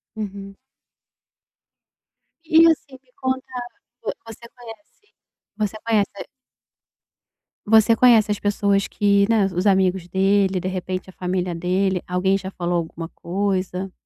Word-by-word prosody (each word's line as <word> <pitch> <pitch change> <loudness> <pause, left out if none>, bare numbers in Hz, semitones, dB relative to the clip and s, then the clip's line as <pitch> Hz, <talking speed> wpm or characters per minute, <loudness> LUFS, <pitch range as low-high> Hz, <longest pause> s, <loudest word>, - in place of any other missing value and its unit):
Uhum. 200 -2 -7 1.9
E, 320 +1 +6
assim, 280 -4 -5
me 250 - -33
conta, 260 -1 -3 0.5
vo - - -2
você 230 +1 -11
conhece 245 +5 -14 0.6
você 210 -1 -2
conhece 215 -3 +2 1.6
Você 220 +1 +5
conhece 225 -4 +5
as 205 - -2
pessoas 200 -1 +1
que, 200 -1 +2
né, 220 -3 +3
os 185 +2 -1
amigos 190 -2 +2
dele, 195 0 +2
de 185 - -4
repente, 185 0 -4
a - - -13
família 180 -1 -2
dele, 180 +2 0
alguém 185 +2 +1
já 190 0 -7
falou 175 -1 -2
alguma 165 0 -5
coisa? 190 0 -3
195 Hz, 125 wpm, -22 LUFS, 185-220 Hz, 1.9 s, E